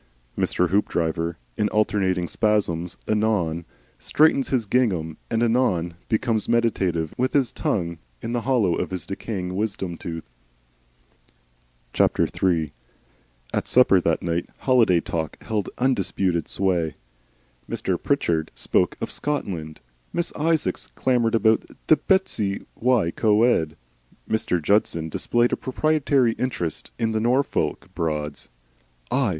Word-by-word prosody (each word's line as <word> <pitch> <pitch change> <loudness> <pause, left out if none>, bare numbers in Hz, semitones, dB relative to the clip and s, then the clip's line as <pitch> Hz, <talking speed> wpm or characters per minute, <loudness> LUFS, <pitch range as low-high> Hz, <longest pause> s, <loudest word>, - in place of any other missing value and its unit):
Mr. 90 -1 +1
Hoopdriver 85 -3 0 0.2
in 105 - +1
alternating 95 -4 +1
spasms 90 -6 0
anon 105 -7 +1 0.3
straightens 150 -3 +3
his 125 -5 +1
gingham 95 -9 +1
and 115 0 +1
anon 110 -8 +1 0.2
becomes 110 -1 0
meditative, 95 -9 +1
with 130 +1 +1
his 135 -4 +2
tongue 85 -4 -2 0.2
in 115 - -5
the 120 0 0
hollow 115 -9 +2
of - - -2
his 95 -1 -4
decaying 95 -2 -4
wisdom 95 -4 -2
tooth. 80 -1 -6 2.2
III 80 -5 +2 0.8
At - - -1
supper 110 -7 +5
that 85 -1 0
night, 85 0 -1
holiday 115 -10 +4
talk 80 -2 -3
held 105 -3 -2
undisputed 95 -8 0
sway. 90 -5 0 0.7
Mr. - - -2
Pritchard 80 -2 0
spoke - - +1
of - - -4
"Scotland," 90 - -3 0.3
Miss 170 - -1
Isaacs 160 0 0
clamoured 120 -3 +2
of 115 - 0 0.4
Bettws 145 - +2
y 120 -8 +2
Coed, 105 -8 +2 0.5
Mr. 110 -5 0
Judson 85 -2 +1
displayed 120 +9 +1
a - - +4
proprietary 140 -2 +2
interest 90 - -3
in 115 -1 0
the 110 - 0
Norfolk 125 +5 0
Broads. 75 -5 -3 0.6
"I?" 130 -4 +2
100 Hz, 115 wpm, -24 LUFS, 85-120 Hz, 2.2 s, supper